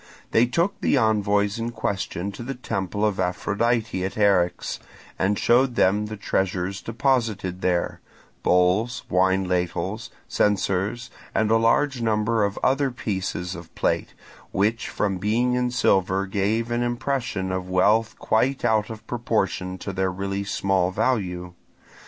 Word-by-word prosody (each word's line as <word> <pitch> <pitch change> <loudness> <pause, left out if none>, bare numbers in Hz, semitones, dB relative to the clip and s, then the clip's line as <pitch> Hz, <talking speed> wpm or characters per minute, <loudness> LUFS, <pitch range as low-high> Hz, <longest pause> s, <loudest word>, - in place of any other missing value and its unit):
They 115 +2 +4
took 175 +10 0
the - - +3
envoys 105 -2 +2
in 115 +1 -2
question 100 -2 -3
to 100 - -9
the 135 +3 -4
temple 100 -4 -2
of 105 -2 0
Aphrodite 105 +2 0
at 95 - -3
Eryx 90 -4 +2 0.4
and 100 +2 +2
showed 125 +1 +3
them 105 +1 +2
the 110 0 -6
treasures 95 -1 -1
deposited 115 -7 -1
there: 90 -1 0 0.4
bowls, 95 +7 +2
wine 95 +1 +3
ladles, 90 +4 -2 0.2
censers, 105 +4 0 0.2
and 110 0 +2
a 115 - +6
large 120 +3 +2
number 110 0 +1
of 100 0 -1
other 135 +1 +2
pieces 95 -6 -3
of 85 -2 -11
plate, - - -1 0.4
which 110 +4 0
from 95 -3 -1
being 115 +5 +1
in 125 0 +1
silver 95 -5 +2
gave 105 +4 -1
an 120 0 0
impression 120 -6 -2
of 95 0 -3
wealth 105 +5 +3
quite 130 +5 +1
out 110 -1 +2
of 110 -1 -8
proportion 105 -6 -1
to 100 +2 -6
their 95 0 0
really 100 +1 -3
small 95 -2 +1
value. 90 -5 -1
105 Hz, 140 wpm, -24 LUFS, 95-115 Hz, 0.4 s, a